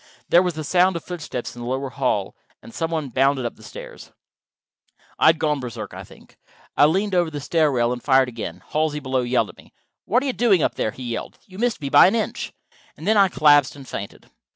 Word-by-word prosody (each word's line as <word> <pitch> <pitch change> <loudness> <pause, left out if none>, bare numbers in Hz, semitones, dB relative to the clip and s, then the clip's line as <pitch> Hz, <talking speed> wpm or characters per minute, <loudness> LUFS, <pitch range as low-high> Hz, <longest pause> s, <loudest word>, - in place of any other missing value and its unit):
There 175 - +6
was 180 -3 -1
the 155 - -4
sound 180 +4 +3
of 170 - -4
footsteps 155 -10 -6
in 120 - -9
the 120 - -6
lower 130 +1 -3
hall, 125 -7 -1 0.3
and 115 - -13
some 165 - -2
one 155 -4 -3
bounded 135 +1 +1
up 120 - -4
the - - -19
stairs. - - -11 1.1
I - - +5
had 160 0 +6
gone 150 -2 0
Berserk, 125 -4 -7
I - - -8
think. - - -18 0.4
I 145 - +6
leaned 195 +5 0
over 175 -2 +2
the 150 -2 -6
stair 155 +1 +1
rail 120 -2 +1
and 125 - -7
fired 130 -2 +4
again. 105 -7 -7
Halsey, 155 -1 0
below, 130 -2 -1
yelled 120 -3 0
at - - -14
me. - - -18 0.3
"What 245 +6 +2
are - - -3
you 265 - -1
doing 205 -11 +3
up - - +1
there?" - - -1
he 130 - -9
yelled. 120 -1 -5
"You 190 0 -13
missed 240 -5 0
me 140 - -3
by - - +7
an 195 - +1
inch." 225 - -3 0.5
And - - -10
then 220 - +3
I 200 -2 +6
collapsed 145 -5 +4
and 135 -2 -12
fainted. 100 0 -8
145 Hz, 235 wpm, -22 LUFS, 125-175 Hz, 1.1 s, by